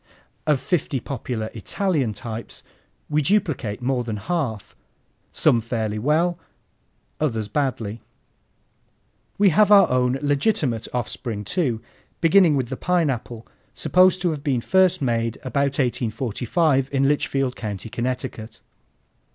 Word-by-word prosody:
Of 150 -3 +3
fifty 145 -5 -1
popular 115 -4 -4
Italian 140 - -1
types 115 +2 -7 0.4
we 150 0 +1
duplicate 145 - 0
more 125 -1 0
than 110 -3 -4
half, 115 - -3 0.6
some 115 - +3
fairly 110 -2 -2
well, 165 +7 +1 0.8
others 115 -8 -1
badly. 115 -4 -2 1.4
We 200 -1 +5
have 205 +5 +4
our 200 -1 +8
own 125 0 +2
legitimate 145 - 0
offspring 115 -3 -4
too, 120 - -1 0.4
beginning 170 -2 +5
with 130 -4 -1
the 130 - -4
Pineapple, 135 -10 -1 0.3
supposed 185 0 +3
to 175 - +2
have 150 -2 -5
been 135 -4 +1
first 185 0 +3
made 115 -2 0
about 140 +2 0
1845 130 - 0
in 135 -1 +2
Litchfield 135 -3 0
County, 105 -1 -5
Connecticut. 120 -2 -4
130 Hz, 120 wpm, -23 LUFS, 115-155 Hz, 1.4 s, our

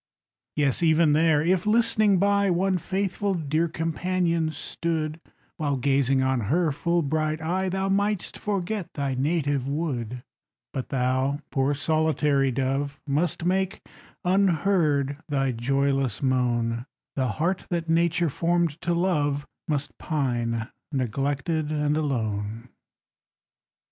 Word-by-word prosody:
Yes, 145 -1 +1
even 160 -2 +4
there, 155 -1 +4
if, 185 +3 +1
listening 215 -2 +3
by, 200 +1 +3
One 185 +1 +1
faithful 195 +2 -1
dear 160 0 0
companion 165 0 0
stood, 155 +1 -3 0.4
While 145 -3 0
gazing 135 0 +2
on 130 -1 +1
her 165 +2 +2
full 170 +4 0
bright 155 +1 0
eye, 185 +4 -1
Thou 190 +1 -1
mightst 200 0 0
forget 200 -2 -2
thy 140 -2 -1
native 140 -1 0
wood 125 -6 -3 0.5
But 130 - -4
thou, 130 +2 0
poor 135 0 +1
solitary 150 -2 +2
dove, 135 +3 -1
Must 150 +3 0
make, 190 +1 0 0.4
unheard, 170 -6 +2
thy 135 -2 +1
joyless 135 0 0
moan; 120 -2 0 0.3
The 130 -2 +1
heart 175 +4 -1
that 170 -2 -2
Nature 170 0 +2
formed 170 0 0
to 175 0 0
love 145 -5 +1 0.2
Must 145 -2 -2
pine, 120 -6 -1 0.2
neglected, 140 +4 -1
and 150 -1 +1
alone. 115 -5 -2
155 Hz, 120 wpm, -26 LUFS, 135-175 Hz, 0.5 s, even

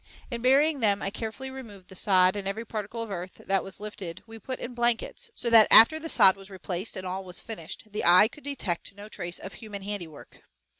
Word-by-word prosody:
In 235 -1 -4
burying 280 +4 +3
them, 205 -3 +2
I 195 - -2
carefully 225 +5 -6
removed 215 -8 -11
the 190 - -12
sod 185 0 +3
and 200 -1 -4
every 220 +4 -4
particle 220 +1 -5
of 225 - -8
earth 180 -1 -6
that 195 -1 +1
was 195 - -6
lifted 200 -5 -8
we 225 0 -11
put 255 +4 -5
in 245 - -7
blankets, 240 - -1
so 235 - -3
that 225 -2 +8
after 270 +8 +8
the 325 +1 -5
sod 190 - +6
was 195 0 -14
replaced 190 +2 -5
and 190 - -6
all 185 +1 -4
was 180 -1 0
finished 210 -9 -8
the 210 - -4
eye 180 +5 +6
could 295 +6 -16
detect 210 -10 -4
no 205 +1 -10
trace 175 -4 -5
of 195 - -8
human 210 -4 -9
handiwork. 180 -7 -8
210 Hz, 220 wpm, -27 LUFS, 190-235 Hz, -, that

